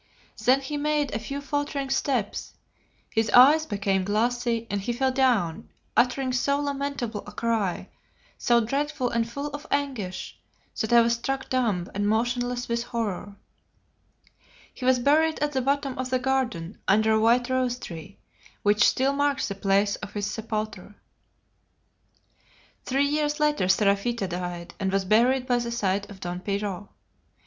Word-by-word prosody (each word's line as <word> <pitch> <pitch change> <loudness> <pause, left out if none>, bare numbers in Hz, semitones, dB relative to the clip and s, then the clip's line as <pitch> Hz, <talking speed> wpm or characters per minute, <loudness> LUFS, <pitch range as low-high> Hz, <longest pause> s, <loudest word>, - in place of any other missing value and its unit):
Then 260 +2 +5
he 290 +2 -4
made 295 -1 0
a 215 - -1
few 275 +6 -5
faltering 285 -1 -2
steps, 255 -7 -1 0.6
his 225 -1 +1
eyes 295 +7 +7
became 200 -2 0
glassy, 230 +3 0
and 200 0 -2
he 240 +5 -2
fell 260 +2 +1
down, 245 -11 +1 0.3
uttering 255 +1 +2
so 280 +3 +1
lamentable 280 -6 -3
a - - -8
cry, 220 -4 -1 0.5
so 240 -1 +3
dreadful 275 +2 -1
and 230 0 0
full 280 +5 -4
of 290 +1 -8
anguish, 255 -10 -3 0.4
that 220 - -1
I 235 0 +7
was 235 0 +2
struck 265 +3 -3
dumb 215 -9 0
and 205 +1 -1
motionless 245 +2 0
with 235 0 -1
horror. 210 -4 -4 1.4
He 250 - -7
was 260 0 +5
buried 310 +5 +3
at 295 0 -1
the 265 -2 0
bottom 275 0 0
of 255 0 -2
the 255 - +2
garden 250 -9 -2
under 215 +3 +4
a 220 - +4
white 240 +2 +3
rose 255 -1 +1
tree, 170 -3 -9 0.5
which 205 0 +4
still 270 +2 +1
marks 285 0 0
the - - -2
place 200 +1 +1
of 205 0 -9
his 205 -1 -2
sepulture. 215 -2 -4 1.9
Three 270 +2 +2
years 295 +1 0
later 300 -9 +2
Seraphita 200 +2 +2
died, 175 -1 -5
and 190 -2 0
was 195 0 0
buried 245 +6 +3
by 245 -2 +2
the 235 0 -3
side 200 -3 -1
of 200 -2 -11
Don 175 0 -4
Pierrot. 200 0 -3
235 Hz, 155 wpm, -26 LUFS, 205-270 Hz, 1.9 s, eyes